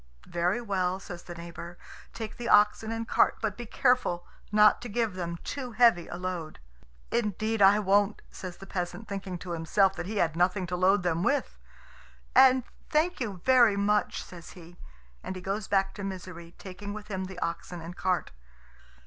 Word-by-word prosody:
"Very 175 +6 0
well," 190 -5 -1
says 175 -2 -8
the 175 - -9
neighbour; 170 +1 -9 0.3
"take 220 -2 -7
the 240 -1 -4
oxen 210 +1 +4
and 225 0 -3
cart, - - +3
but 215 -3 -2
be 240 -1 -8
careful 245 -9 +1 0.3
not 210 +1 +5
to 240 - -6
give 225 -1 0
them 170 -2 -4
too 255 -4 -5
heavy 225 -7 +4
a - - -6
load." 180 -3 -5 0.5
"Indeed 215 0 0
I 195 +1 +7
won't," 205 0 +2
says 185 -2 -8
the 195 - -11
peasant, 180 +2 -4
thinking 195 -3 -5
to 175 +1 -8
himself 185 +4 +2
that 175 - -4
he 215 +1 -4
had 165 -4 +1
nothing 180 +2 +1
to 180 +1 -3
load 185 +2 +3
them 170 -1 0
with. 60 - 0 0.8
"And 260 -1 +6 0.3
thank 330 +4 +1
you 205 -8 -4
very 240 -6 +6
much," 205 0 +1
says 170 -3 -12
he; 175 -1 -13 0.5
and 190 - -5
he 185 - -7
goes 195 +2 -3
back 195 -1 +1
to 205 - -7
Misery, 180 -3 -7
taking 200 +2 -8
with 210 0 -9
him 190 -2 -3
the 185 -1 -9
oxen 175 0 -4
and 170 +2 -8
cart. 185 -2 -1
195 Hz, 185 wpm, -28 LUFS, 175-215 Hz, 0.8 s, I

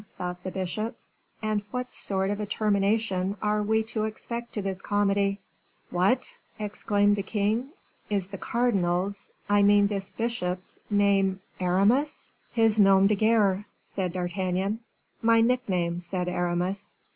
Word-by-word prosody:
thought 180 0 -4
the 185 - -3
bishop, 190 +4 -3 0.5
"and 215 -1 0
what 250 +2 -4
sort 190 0 -1
of 205 - -2
a 210 - -2
termination 200 -2 +1
are 210 +1 +1
we 220 +1 +2
to 220 -1 -2
expect 235 +2 -5
to - - -4
this 195 -1 -3
comedy?" 200 -1 +1 0.5
"What!" 190 +9 +2 0.3
exclaimed 205 -1 +1
the - - 0
king, 215 +5 -1 0.4
"is 195 -3 -1
the 195 -1 -7
cardinal's, 200 -5 0 0.2
I 205 0 +4
mean 205 0 +6
this 200 -1 -2
bishop's, 185 -6 -3
name 200 -2 +3 0.2
Aramis?" 200 +11 +2 0.2
"His 225 -2 +3
nom 195 -1 +6
de 205 - +4
guerre," 210 -2 +3 0.2
said 185 -3 -3
D'Artagnan. 185 +3 -1 0.4
"My 230 0 +5
nickname," 195 -8 +1
said 180 +1 -3
Aramis. 180 +2 -2
200 Hz, 135 wpm, -27 LUFS, 190-215 Hz, 0.5 s, mean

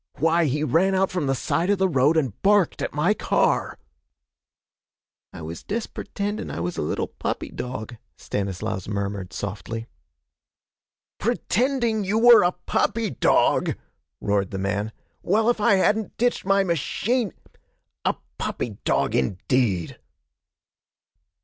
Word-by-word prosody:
'Why, 165 +3 +3
he 150 +1 0
ran 170 +7 +2
out 190 0 +2
from 180 -6 -1
the 135 - +1
side 170 +7 0
of 205 - +3
the 190 0 +3
road 150 0 +3
and 130 -10 -1
barked 200 -3 +3
at - - -2
my 160 +8 +2
car!' - - +1 1.5
'I 85 - -9
was 80 +2 -6
dest 220 +2 -4
pertendin' 205 +1 -4
I - - -5
was 90 +1 -2
a - - -2
little 75 - -1
puppy - - -4
dog,' 125 -2 -6 0.2
Stanislaus 100 0 -3
murmured 100 -2 -3
softly. 105 +3 -5 1.3
'Pretending 235 -2 0
you 200 +3 0
were 235 +1 +8
a 175 - +3
puppy 225 -2 0
dog!' 125 - +2 0.4
roared 100 -2 0
the 95 - -5
man. 100 +3 -2 0.3
'Well, 220 +5 +3
if 230 - -4
I 205 - +5
hadn't 210 +3 +1
ditched 245 -3 +1
my 195 0 +3
machine! 195 - 0 0.7
A - - +1 0.2
puppy 105 -5 -3
dog, - - +1
indeed!' 95 - 0
155 Hz, 135 wpm, -24 LUFS, -, 1.5 s, were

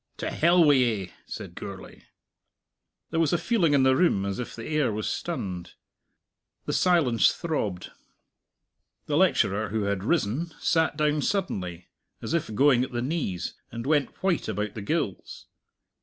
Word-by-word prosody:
"To - - -3
hell 170 +2 +4
wi' 150 -2 +6
ye!" 115 -9 +1
said - - -7
Gourlay. - - -9 1.1
There 165 - 0
was 165 -2 +2
a - - +4
feeling 170 -7 +2
in 135 - +4
the 130 0 +4
room 130 - +2
as 100 +2 -3
if 125 - -5
the 115 - -7
air 150 -6 +1
was 105 0 -3
stunned. 90 -3 -4 0.9
The - - -2
silence 160 -11 +4
throbbed. 105 - -3 1.1
The - - -1
lecturer, 105 +2 +2
who 110 0 -1
had 100 -1 -1
risen, 160 +4 0
sat 160 -1 +1
down 150 -1 +1
suddenly 90 - -2 0.3
as - - -4
if 165 -9 -1
going 135 0 +4
at 130 - -6
the 120 0 -1
knees, 125 - -2 0.2
and 115 +1 -6
went 145 +3 0
white 190 -4 +1
about 105 0 -2
the 110 - -6
gills. 100 - -3
130 Hz, 155 wpm, -26 LUFS, 105-160 Hz, 1.1 s, wi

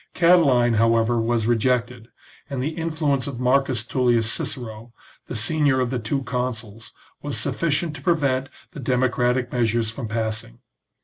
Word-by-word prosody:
Catiline, 145 -9 +4
however, 115 +1 +3
was 115 -1 0
re 120 +1 +3
jected, 125 0 -1 0.4
and 135 -2 -3
the 135 +4 -1
influence 155 -5 -1
of 130 -4 -5
Marcus 130 -2 +1
TuUius 120 -1 +2
Cicero, 115 0 -4 0.4
the - - -6
senior 140 +4 +2
of 125 -1 0
the 125 - -1
two 115 +5 -1
new 135 - -4
consuls, 115 -4 -4 0.3
was - - -3
sufficient 155 -1 0
to - - -12
prevent 140 -7 +1 0.2
the 170 - -9
democratic 125 -1 +1
measures 115 -2 0
from 115 0 -6
passing. 110 - -3
125 Hz, 150 wpm, -23 LUFS, 115-140 Hz, 0.4 s, Catiline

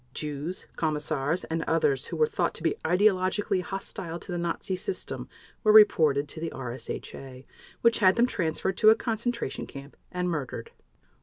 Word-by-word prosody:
Jews, 150 +4 -4
commissars, 155 0 -1
and 165 0 -2
others 145 -5 +1
who - - -5
were 460 - +5
thought 460 +1 -1
to - - -6
be - - +2
ideologically 185 0 +2
hostile 185 -2 -5
to 180 - -9
the 175 - -2
Nazi 170 +2 -2
system 380 - -5 0.3
were 215 - +5
reported 155 -9 +6
to 160 - -6
the 165 0 -3
RSHA, 130 +1 -7 0.4
which 230 -1 +4
had 190 -3 +5
them 235 - +4
transferred 190 -4 -1
to 215 - +7
a 220 - +7
concentration 230 - -3
camp 140 +1 -10 0.2
and 180 0 -1
murdered. 150 -8 -4
175 Hz, 160 wpm, -27 LUFS, 150-205 Hz, 0.4 s, to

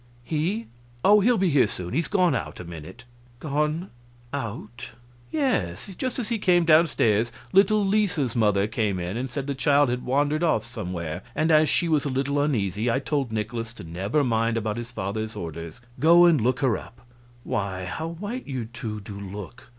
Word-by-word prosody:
"He? 170 - -1 0.4
Oh, 210 +2 +7
he'll 235 +4 +3
be 185 -3 +2
here 140 -6 +4
soon; 90 -4 -6
he's 165 +5 0
gone 180 -6 +3
out 75 - -4
a - - -6
minute." 85 +7 -10 0.4
"Gone 150 +5 -1 0.4
out?" 120 -1 -5 0.4
"Yes. 195 - -1
Just 255 +4 -3
as 240 -4 -3
he 230 -2 0
came 175 -3 +3
down 165 +1 +6
stairs 115 -4 +1 0.2
little 205 +2 +5
Lisa's 190 - +1
mother 105 -4 +3
came 105 -3 -1
in 90 +3 -3
and 130 +3 -3
said 135 +2 -4
the 140 - -2
child 140 0 +3
had 125 0 -2
wandered 145 +4 +1
off 155 -10 +2
somewhere, 90 -8 -5
and 160 +1 +2
as 155 -1 +5
she 170 - +2
was 155 -3 +2
a 145 - -2
little 140 +2 0
uneasy 110 - 0
I 115 - +2
told 135 -2 -1
Nikolaus 115 +1 -3
to - - -10
never 95 - -1
mind 115 -2 +1
about 110 -1 -2
his 120 0 -6
father's 110 +1 -4
orders 85 +5 -7 0.2
go 170 +5 +7
and 165 -7 +5
look 125 +5 +1
her 125 -8 +2
up.... 120 +1 -14 0.4
Why, 95 -2 -2
how 160 - -4
white 205 +10 -6
you 130 -4 -3
two 110 -2 -6
do 100 0 -8
look! 100 +4 -8
125 Hz, 190 wpm, -25 LUFS, 105-160 Hz, 0.4 s, Oh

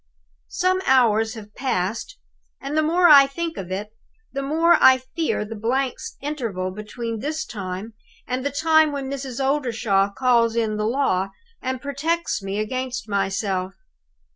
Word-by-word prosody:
"Some 370 +1 +1
hours 225 -3 +3
have 210 -2 -11
passed, 230 - -2 0.4
and 275 +2 -5
the 310 - +4
more 345 +3 +4
I 280 -3 +9
think 330 +3 -4
of 185 - -6
it, 205 +3 -4 0.4
the 275 - -2
more 325 +5 +3
I 260 0 +8
fear 260 -2 -2
the 220 - -7
blank 245 +4 -1 0.2
interval 230 -11 -3
between 220 +3 -5
this 310 +5 -3
time 195 +1 -6 0.3
and 255 +1 -3
the 285 - 0
time 315 +2 +3
when 275 -2 -4
Mrs. 270 -2 -5
Oldershaw 235 -8 +1
calls 235 0 +2
in 220 -2 0
the 215 0 0
law, 220 -7 +1 0.3
and 260 0 -3
protects 305 +2 -1
me 195 +1 -4
against 255 +2 -3
myself. 195 -1 -1
250 Hz, 150 wpm, -23 LUFS, 210-285 Hz, 0.4 s, I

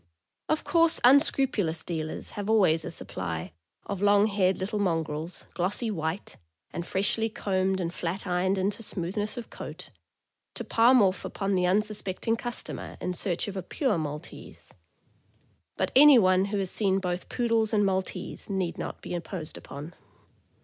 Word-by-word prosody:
Of 310 - +1
course 330 -1 +4
unscrupulous 250 - +3
dealers 160 -2 -4
have 205 0 -5
always 185 -8 +4
a - - -5
supply 85 - -5 0.3
of 200 -2 -4
long 205 0 +5
haired 195 -3 +2
little 205 +3 -3
mongrels, 165 -3 -2
glossy 200 +6 -1
white, 160 0 -4 0.3
and 170 - -5
freshly 215 +4 +1
combed 190 -2 0
and 170 -1 -2
flat 180 +3 -3
ironed 185 +1 +1
into 200 +3 -1
smoothness 205 +3 -2
of 240 - -7
coat, - - -9 0.6
to - - -4
palm 240 +1 +5
off 190 0 +1
upon 195 -1 -2
the 180 -1 +2
unsuspecting 210 +2 0
customer 240 +1 -5
in 180 - -2
search 180 0 -1
of 200 - -5
a 190 - -2
"pure 240 - -1
Maltese;" 150 +2 -7 1.0
but - - 0
anyone 225 -10 +7
who 200 +1 -2
has 190 -2 -1
seen 195 -3 +1
both 180 -2 -3
Poodles 230 -3 +1
and 205 -2 +3
Maltese 190 +1 -3
need 190 -4 -2
not - - -6
be - - -5
imposed 170 -1 -5
upon. 150 +5 -9
190 Hz, 150 wpm, -27 LUFS, 175-215 Hz, 1.0 s, anyone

